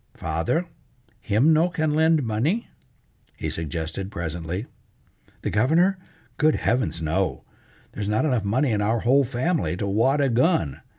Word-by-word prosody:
"Father, 80 - -1 0.5
him 115 +9 +3
no 165 +3 +3
can 155 -3 -1
lend 160 -1 +3
money?" 125 - -1 0.7
he - - -3
suggested 80 +4 -4
presently. 85 +2 -4 0.8
"The - - -1
Governor? 165 - +3 0.4
Good 155 0 +4
heavens, 115 -9 -1
no. 90 +5 -1 0.5
There's 105 -1 -4
not 110 +8 +1
enough 125 -8 +1
money 125 +7 +1
in 105 -1 0
our 110 +2 +1
whole 135 +4 +4
family 135 - -1
to 100 - -2
wad 115 +9 +2
a 140 -2 +2
gun! 120 - +1
115 Hz, 140 wpm, -24 LUFS, 95-155 Hz, 0.8 s, Good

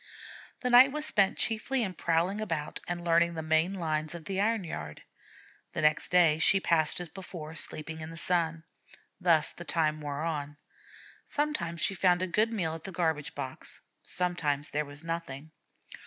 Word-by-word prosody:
The 250 - 0
night 255 +3 +8
was 300 +1 -3
spent 195 -2 +2
chiefly 235 +3 +1
in 190 -3 -2
prowling 170 +5 0
about 165 -8 -3
and 175 -1 -4
learning 170 0 +3
the 160 - -4
main 160 +4 +2
lines 155 -2 -2
of 165 -2 -9
the 195 +2 -1
iron 220 -1 +1
yard. 75 - -7 0.7
The - - -2
next 150 0 +3
day 170 -4 +4
she 195 +4 +5
passed 165 -4 +2
as 175 - -4
before, 165 -3 -8
sleeping 160 0 -1
in 155 - -6
the 165 - -9
sun. 165 -2 0 0.6
Thus 165 -4 +3
the 175 - -10
time 155 -3 0
wore 145 0 -4
on. 150 -3 -3 0.7
Sometimes 285 - -1
she - - +3
found 180 -1 +3
a - - 0
good 215 +6 +1
meal 175 -8 -1
at 160 - -8
the 195 - -6
garbage 160 -3 -1
box, 130 0 -5 0.2
sometimes 155 -5 -1
there 150 +1 -1
was 145 +2 -8
nothing. 160 -3 -5
165 Hz, 175 wpm, -30 LUFS, 155-185 Hz, 0.7 s, night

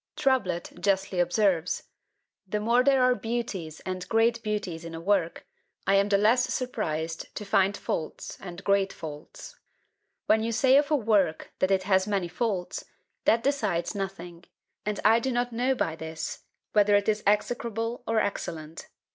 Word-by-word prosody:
Trublet 260 - 0
justly 195 -2 0
observes 175 -1 +1 0.6
The 210 +3 -1
more 235 +4 +3
there 270 -1 +4
are 250 0 +5
beauties 220 -8 -4
and 185 -1 -5
great 230 +1 +3
beauties 205 -6 -3
in 165 0 -7
a - - -5
work, 175 -1 0 0.4
I 195 - +3
am 200 +1 +4
the 200 - +4
less 225 +5 +3
surprised 165 - -3
to 210 - -5
find 200 0 +2
faults 155 - -4
and 180 0 -8
great 200 -1 +2
faults. 150 -2 -9 0.7
When 220 - +4
you 230 +1 -1
say 260 +3 +4
of 290 0 +2
a 305 - +3
work 210 - +1
that 185 - +2
it 190 -1 +2
has 190 0 +2
many 195 -4 -1
faults, 190 -2 -2 0.4
that 230 0 +4
decides 210 -12 0
nothing: 180 -4 -6 0.4
and 210 -1 -1
I 225 +2 +6
do 260 +3 -1
not 245 0 -1
know 250 +3 +1
by 165 -9 -1
this, 160 0 -6 0.3
whether 205 -1 +5
it 205 0 +2
is 215 -1 +1
execrable 230 +2 0
or 225 -1 +2
excellent. 165 -6 -4
205 Hz, 165 wpm, -27 LUFS, 180-230 Hz, 0.7 s, I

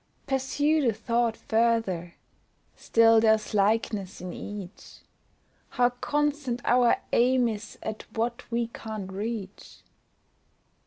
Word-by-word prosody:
Pursue 285 +3 +1
the 230 - +3
thought 230 +1 0
further, 220 -7 0 0.6
still 225 -1 +4
there's 220 0 +2
likeness 205 -1 0
in 180 0 -6
each, 205 -2 -9 0.7
How 245 0 +2
constant 290 -1 -1
our 245 -1 +4 0.2
aim 250 0 +4
is 215 -1 -6
at 220 0 -6
what 235 +2 -2
we 235 0 0
can't 215 -4 -6
reach. 205 -1 -6
230 Hz, 105 wpm, -27 LUFS, 210-245 Hz, 0.7 s, still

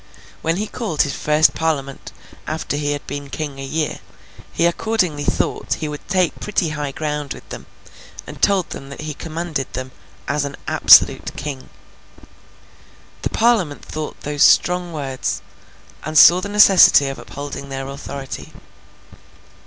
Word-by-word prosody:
When 165 +1 0
he 205 +4 -2
called 210 - -1
his 140 - -3
first 150 +1 +3
Parliament 140 -4 -3 0.4
after 155 -2 -3
he 145 0 -1
had 145 - -6
been 140 0 -6
king 140 0 -5
a - - -5
year, 155 +3 -2 0.5
he 170 - +1
accordingly 175 -4 0
thought - - -1
he 155 - -4
would 150 -1 -8
take 185 -2 0
pretty 190 -5 -1
high 150 -2 -4
ground 150 -1 -4
with - - -14
them, - - -9 0.6
and - - -11
told 195 -3 +2
them 135 - -8
that 140 - -9
he 155 0 -5
commanded 160 -3 -4
them 130 0 -5 0.4
'as 145 0 0
an 140 -1 -5
absolute - - +5
king.' 135 -2 -6 1.5
The - - -1
Parliament 220 -11 +1
thought 155 -1 -6
those 145 -1 -4
strong 180 +2 +4
words, 135 -4 -3 0.6
and 155 +1 -2
saw 175 +4 +8
the 200 - -5
necessity 195 -8 +7
of 135 - -5
upholding 140 -1 -8
their 135 0 -5
authority. 140 -1 -7
150 Hz, 150 wpm, -20 LUFS, 140-170 Hz, 1.5 s, saw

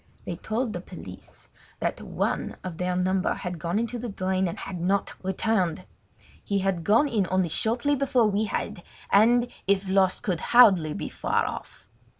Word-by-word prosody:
They - - -4
told 225 +1 -2
the 175 - -4
police 95 - -12 0.3
that - - -2
one - - -2
of 175 -3 -6
their 180 0 0
number 185 +1 +1
had 180 -2 -5
gone 170 +5 -1
into 235 +2 -2
the 240 0 -4
drain, 190 -1 -1
but 170 - -2
had 180 -3 -6
not 195 +3 0
returned. 190 -2 0 0.6
He 200 - -1
had 190 -3 0
gone 225 - +4
in 210 -8 0
only 185 -2 +1
shortly 240 - +1
before 260 -4 +2
we 210 +1 +1
had, 195 - -3 0.3
and, 235 +4 +5 0.2
if 195 0 +2
lost, 190 -1 +2
could 185 -8 -1
hardly 190 -11 +5
be - - -4
far - - 0
off. - - -7
195 Hz, 170 wpm, -26 LUFS, 180-220 Hz, 0.6 s, and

